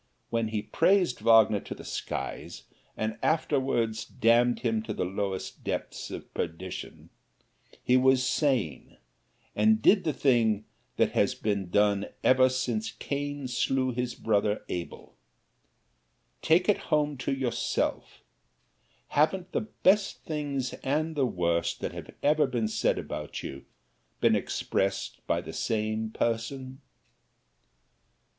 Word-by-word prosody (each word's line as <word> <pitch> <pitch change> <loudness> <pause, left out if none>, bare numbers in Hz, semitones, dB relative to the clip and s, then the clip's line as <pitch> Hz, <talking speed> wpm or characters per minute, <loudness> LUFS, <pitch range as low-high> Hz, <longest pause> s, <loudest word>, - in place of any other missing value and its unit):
When 115 -1 +1
he 110 -1 -2
praised 185 -8 +2
Wagner 110 -2 +5
to - - -7
the - - -11
skies 65 - -5 0.3
and 110 0 -2
afterwards 135 -8 +1
damned 120 +2 +2
him 115 -3 0
to 110 -1 -5
the - - -1
lowest 95 0 -4
depths - - -4
of - - -8
perdition, 85 +2 -6 0.7
he 125 - +4
was 130 0 +4
sane, 125 - 0 0.6
and 110 +1 +4
did 190 - +5
the 155 - +1
thing 115 -7 +2 0.3
that - - +3
has - - +2
been 100 -4 -2
done 100 +1 +2 0.4
since 175 +13 -1
Cain 145 -1 -4
slew 130 +1 0
his 125 0 -3
brother 105 -1 0
Abel. 85 -1 -6 1.3
Take 170 +3 +3
it 210 - +4
home 150 -2 +2
to 130 - -2
yourself 130 -3 -2 0.9
haven't 180 +5 +1
the - - 0 0.2
best 200 +2 +3
things 145 -5 -3
and 155 +4 0
the 135 -3 +2
worst 85 -5 0
that - - -2
have - - -8
ever 150 0 +4
been 120 -4 -1
said 110 - +1
about - - -5
you, 70 - -7 0.5
been - - +4
expressed 100 0 -1
by - - +1
the - - -9
same 110 0 -1
person? 130 +4 -3
120 Hz, 125 wpm, -28 LUFS, 110-145 Hz, 1.3 s, Wagner